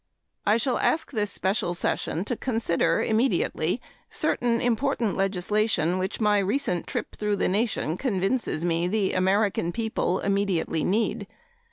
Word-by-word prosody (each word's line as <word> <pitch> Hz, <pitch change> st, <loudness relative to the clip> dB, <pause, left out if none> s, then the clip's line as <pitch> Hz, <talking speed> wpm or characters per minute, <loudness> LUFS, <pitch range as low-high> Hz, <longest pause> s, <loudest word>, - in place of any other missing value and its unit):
I 210 Hz, +2 st, +5 dB
shall 245 Hz, +2 st, 0 dB
ask 320 Hz, -, +1 dB
this 210 Hz, -5 st, -1 dB
special 190 Hz, -2 st, -1 dB
session 170 Hz, +1 st, -1 dB
to 245 Hz, -, -1 dB
consider 225 Hz, -8 st, +1 dB
immediately 230 Hz, +4 st, +1 dB, 0.3 s
certain 235 Hz, -1 st, 0 dB
important 240 Hz, -2 st, 0 dB
legislation 195 Hz, -2 st, 0 dB
which 185 Hz, +1 st, -3 dB
my 210 Hz, -2 st, +3 dB
recent 195 Hz, -3 st, 0 dB
trip -, -, -4 dB
through 210 Hz, -1 st, 0 dB
the -, -, 0 dB
nation 195 Hz, -5 st, 0 dB
convinces 195 Hz, -, -1 dB
me 170 Hz, 0 st, +1 dB
the 200 Hz, 0 st, 0 dB
American 190 Hz, -1 st, +1 dB
people 220 Hz, -3 st, -1 dB
immediately 195 Hz, -5 st, 0 dB
need. 205 Hz, 0 st, 0 dB
205 Hz, 135 wpm, -26 LUFS, 185-225 Hz, 0.3 s, I